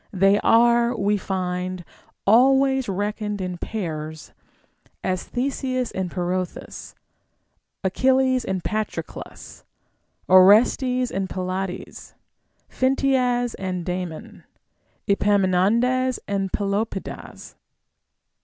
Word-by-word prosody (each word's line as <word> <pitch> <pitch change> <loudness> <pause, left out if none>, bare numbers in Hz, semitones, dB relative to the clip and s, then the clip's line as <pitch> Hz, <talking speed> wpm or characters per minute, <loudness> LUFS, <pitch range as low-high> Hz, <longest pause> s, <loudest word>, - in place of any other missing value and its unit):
They 195 +2 +4
are, 235 +1 +4
we 205 +1 +1
find, 185 -2 -3 0.4
ahvays 265 +4 +4
reckoned 205 +1 -3
in 180 -2 -4
pairs; 160 -6 -5 0.7
as 185 -1 -2
Theseus 255 -1 -2
and 190 -1 -3
Pirithous, 180 0 -4 0.9
Achilles 260 +5 +2
and 190 -2 -3
Patroclus, 215 0 -5 0.6
Orestes 235 +7 +5
and 190 0 -2
Pylades, 185 0 -5 0.5
Phintias 255 -2 +1
and 185 -2 -3
Damon, 180 -3 -5 0.6
Epaminondas 205 +6 +2
and 195 -1 -2
Pelopidas. 200 0 -4
200 Hz, 80 wpm, -23 LUFS, 185-245 Hz, 0.9 s, Orestes